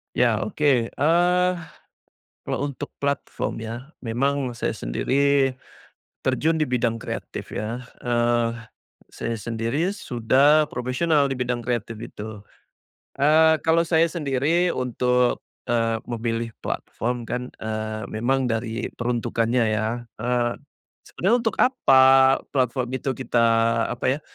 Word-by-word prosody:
Iya, - - +2
oke. 155 -8 -3 0.3
Eee, 175 +4 +3 1.0
kalau - - -2
untuk 140 +1 -8
platform 140 -4 -2
ya, 115 +5 -7
memang 130 +2 -1
saya - - -2
sendiri, 135 - +1 0.7
terjun 155 +5 +1
di 155 - +1
bidang 120 -2 0
kreatif - - -6
ya, 115 +4 -4 0.2
eee, 120 -1 +2 0.6
saya 115 0 -4
sendiri 115 - -1
sudah 140 - +3
profesional 140 +3 +1
di - - -3
bidang 120 -1 -1
kreatif 115 -2 -2
itu. 105 -1 -8 0.8
Eee, 160 +2 +5
kalau 165 +1 +3
saya 165 0 +3
sendiri 160 +3 +1
untuk, 125 0 +1 0.2
eee, 115 -1 +1
memilih 115 0 -2 0.2
platform 120 0 -3
kan, 125 +1 -4
eee, 110 0 -4
memang 130 +4 0
dari 115 0 -2
peruntukannya 120 0 0
ya. 110 0 0 0.3
Eee, 120 +1 0 0.5
sebetulnya 195 +6 0
untuk 230 -2 -1
apa 135 - +5
platform 125 -2 0
itu 135 +1 -2
kita, 125 -3 +1 0.5
apa 120 - -3
ya, - - -11
125 Hz, 115 wpm, -24 LUFS, 115-140 Hz, 1.0 s, Eee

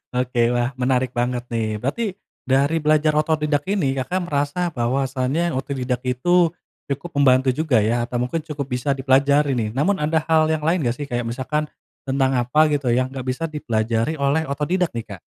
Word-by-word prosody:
Oke, 125 -1 0
wah, 120 +2 0
menarik 125 0 +1
banget 120 0 -1
nih. 110 -2 -1
Berarti 140 - -2 0.4
dari 140 +5 +2
belajar 155 0 +3
otodidak 150 -2 +1
ini 145 -10 0
Kakak 180 +8 -1
merasa 145 +3 -1
bahwasanya 135 +6 0
otodidak 130 -2 -2
itu 165 +7 +2 0.3
cukup 140 +5 -4
membantu 130 -1 +4
juga 130 -4 +2
ya 120 +3 +1
atau 120 0 -3
mungkin 140 +7 -2
cukup 150 -3 -4
bisa 125 +3 0
dipelajari 140 +2 +3
nih. 110 -2 -1
Namun 190 +9 +1
ada 155 +1 +1
hal 160 -1 +4
yang 155 -1 0
lain 170 +2 +2
nggak 120 - 0
sih, 145 - -4
kayak 120 -1 -2
misalkan 130 +6 -2 0.4
tentang 135 -1 +1
apa 150 +6 +3
gitu 145 -4 0
yang 130 +1 +1
nggak 130 -2 -7
bisa 130 +5 -3
dipelajari 115 -2 -1
oleh 140 +3 +1
otodidak 165 +6 0
nih, 115 -1 -4
Kak? 100 -5 -10
135 Hz, 175 wpm, -22 LUFS, 125-155 Hz, 0.4 s, membantu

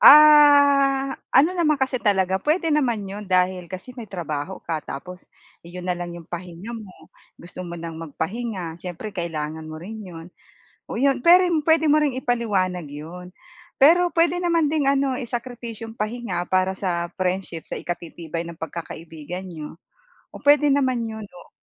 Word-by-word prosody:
Ah, 285 -2 +7 0.2
ano 280 +6 +6
naman 310 -4 +3
kasi 265 0 +1
talaga, 190 -3 +2
puwede 325 - +1
naman 240 -8 +1
'yon 200 +2 -7
dahil 180 -1 +1
kasi 185 +8 -8
may 230 -4 -8
trabaho 170 -1 -4
ka, 160 -2 -2
tapos 180 +7 -8 0.4
'yon 175 +1 -8
na - - +3
lang 175 0 -5
'yong 170 - -10
pahinga 175 +5 -7
mo. 200 -8 -10 0.3
Gusto 180 +1 -10
mo 170 -1 -6
nang 165 -1 -7
magpahinga, 170 +2 -4
siyempre 185 +4 -6
kailangan 160 -3 -4
mo 155 - -7
rin 220 +5 -8
'yon, 165 -3 -9 0.6
oh, - - -5
iyon. 270 0 +3
Pero 355 +2 +8
'yun, 335 -3 +2
puwede 320 0 +4
mo 305 - +5
rin 290 -4 +1
ipaliwanag 205 - 0
'yon, 170 +5 -9 0.5
pero 340 +6 +6
puwede 340 +1 +2
naman 335 -3 +2
ding 305 -3 +1
ano 275 -1 +2
isakripisyo 235 -2 -6
'yung - - -15
pahinga 210 -5 -3
para 185 0 +2
sa 175 -2 -2
friendship 180 -3 -2
sa - - -5
ikatitibay 170 -1 -5
ng 170 - -8
pagkakaibigan 165 +1 -7
n'yo. 160 -4 -8 0.6
O, - - -10
puwede 290 0 +5
naman 260 -4 +2
'yun, 220 -1 -7
o 180 -2 -15
195 Hz, 165 wpm, -23 LUFS, 175-270 Hz, 0.6 s, Pero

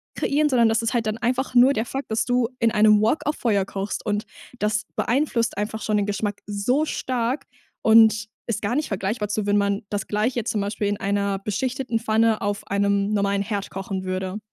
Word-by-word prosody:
kreieren, 295 +1 +1
sondern 235 -4 +4
das 225 +1 +1
ist 230 - -1
halt 230 -3 0
dann 215 - -1
einfach 255 +2 -1
nur 250 +3 +7
der 225 -1 -1
Fakt, 270 -1 -5
dass 220 - +1
du 245 -1 +1
in 230 -1 +3
einem 210 -1 +5
Wok 225 +8 +1
auf 295 - 0
Feuer 205 -5 +1
kochst 195 +1 -4
und 210 -1 -1 0.3
das 210 0 0
beeinflusst 245 -3 0
einfach 215 +1 -3
schon 215 -1 0
den 205 - +1
Geschmack 205 0 -3
so 245 +9 0
stark 255 0 -2 0.4
und 220 -1 +5 0.2
ist 215 -3 -2
gar 205 +4 0
nicht 300 +2 -1
vergleichbar 205 +2 -2
zu, 210 0 -1
wenn 205 0 +3
man 200 0 0
das 205 -2 -3
Gleiche 225 +3 0
zum 210 -2 -1
Beispiel 205 0 -2
in 205 0 -1
einer 200 0 -1
beschichteten 245 +4 -2
Pfanne 225 0 +2
auf 205 0 -2
einem 200 +1 +1
normalen 200 -1 +1
Herd 200 -1 -4
kochen 190 0 -4
würde. 185 +2 -3
215 Hz, 200 wpm, -23 LUFS, 200-235 Hz, 0.4 s, nur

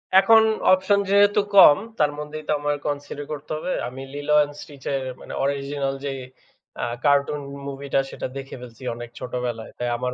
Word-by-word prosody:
এখন 220 +3 +7 0.3
অপশন 190 +2 +3
যেহেতু 205 +1 +5 0.2
কম 150 -7 +9 0.2
তার 150 -1 +3
মধ্যেই 150 +1 -6
তো - - 0
আমার 145 0 0
কন্সিডার 145 0 -4
করতে 150 0 -7
হবে। 180 - -4 0.2
আমি 130 +2 -8
'Lilo& 145 +1 -4 0.3
Stitch' 140 -3 -11
এর 135 - -1 0.2
মানে - - -9
অরজিনাল 140 0 -1
যে 140 - -1 0.7
অ্যা - - -2 0.2
কার্টুন 145 +1 +3 0.3
মুভিটা 140 0 -1
সেটা - - -4
দেখে 135 0 -7
ফেলছি 125 +1 -12
অনেক 120 0 -8
ছোটবেলায়। 125 -2 -4
তাই 120 0 -2
আমার 125 +1 -2
140 Hz, 165 wpm, -23 LUFS, 135-150 Hz, 0.7 s, কম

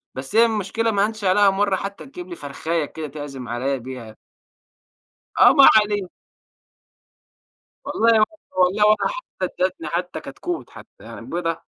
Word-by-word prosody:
بس 135 +9 -7
هي 230 +1 +7
المشكلة 225 +1 -1
ما 200 -1 +2
هانش 215 -1 -6
عليها 200 +2 +4
مرّة 195 0 +1
حتّى 200 +1 -6
تجيب 355 +6 -10
لي 350 - -6
فَرخاية 160 - -3
كده 155 +1 -7
تعزم 140 -3 -8
عليّا 130 +4 -1
بيها. 120 -3 -9 1.3
آه - - +8
ما 275 -2 +8
علينا. 205 -3 +2 1.8
والله 230 0 +3
و - - +6 0.4
والله 185 +4 +3
ولا 215 0 +3
حتّى - - -5 0.2
ادّتني 185 -3 -2
حتّي 175 +1 -3
كتكوت 340 - -6
حتّى. - - -15
يعني - - -10
بيضة، 170 -8 -3
190 Hz, 150 wpm, -22 LUFS, 150-215 Hz, 1.8 s, آه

